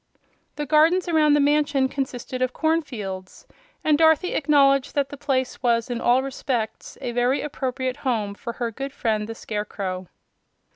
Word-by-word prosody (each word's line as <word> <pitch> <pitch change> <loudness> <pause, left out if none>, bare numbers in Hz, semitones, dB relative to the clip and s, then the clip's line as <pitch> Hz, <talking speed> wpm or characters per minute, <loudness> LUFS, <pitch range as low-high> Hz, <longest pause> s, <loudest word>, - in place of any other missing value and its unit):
The 295 - -3
gardens 320 +6 +4
around 310 -3 +4
the - - +3
mansion 290 -2 +2
consisted 260 -2 -4
of 255 0 0
cornfields, 235 - -3 0.4
and 300 -1 +3
Dorothy 320 +2 +4
acknowledged 275 -2 +3
that 280 -1 +1
the 285 - -7
place 260 -2 -2
was 235 -1 +1
in 240 - -3
all 250 +2 +3
respects 260 -4 -3
a 240 - -3
very 245 +3 +1
appropriate 260 -2 -3
home 225 -8 -1
for 235 +3 -6
her 235 -1 -3
good 275 +4 -6
friend 215 -4 -1
the 225 - -5
Scarecrow. 200 -4 -4
260 Hz, 155 wpm, -24 LUFS, 235-290 Hz, 0.4 s, gardens